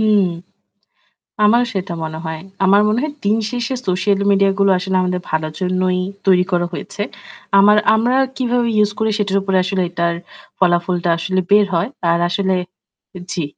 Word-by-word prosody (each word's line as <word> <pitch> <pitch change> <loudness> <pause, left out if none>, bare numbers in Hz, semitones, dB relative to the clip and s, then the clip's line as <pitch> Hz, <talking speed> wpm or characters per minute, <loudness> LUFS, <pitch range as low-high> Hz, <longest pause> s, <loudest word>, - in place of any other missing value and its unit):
হুম। 215 -2 +3 1.2
আমারও 235 +4 +4
সেটা 190 -2 -3
মনে 160 0 -5
হয়। 160 0 -4 0.3
আমার 200 +2 +5
মনে 215 +2 +1
হয় 305 -1 -3
দিন 205 +2 +2
শেষে 245 +1 -3
সোশ্যাল 195 +2 +1
মিডিয়াগুলো 195 0 +3
আসলে 190 +1 -2
আমাদের 180 0 -1
ভালোর 155 0 -2
জন্যই 185 0 0 0.3
তৈরি 180 -1 +4
করা 175 -1 +1
হয়েছে। 200 +3 -6 0.6
আমার 205 +2 +6 0.2
আমরা 235 +3 +1 0.2
কিভাবে 245 -1 0
ইউজ 210 -1 +3
করি 220 0 +1
সেটার 200 -1 0
উপরে 195 -1 0
আসলে 185 +1 -1
এটার 170 -1 -1 0.4
ফলাফলটা 175 -1 +1
আসলে 185 +2 -1
বের 205 +1 +6
হয়। 170 +6 0 0.2
আর 170 - +2
আসলে 190 +1 0 0.8
জ্বি। 170 - -2
190 Hz, 155 wpm, -18 LUFS, 180-210 Hz, 1.2 s, আমার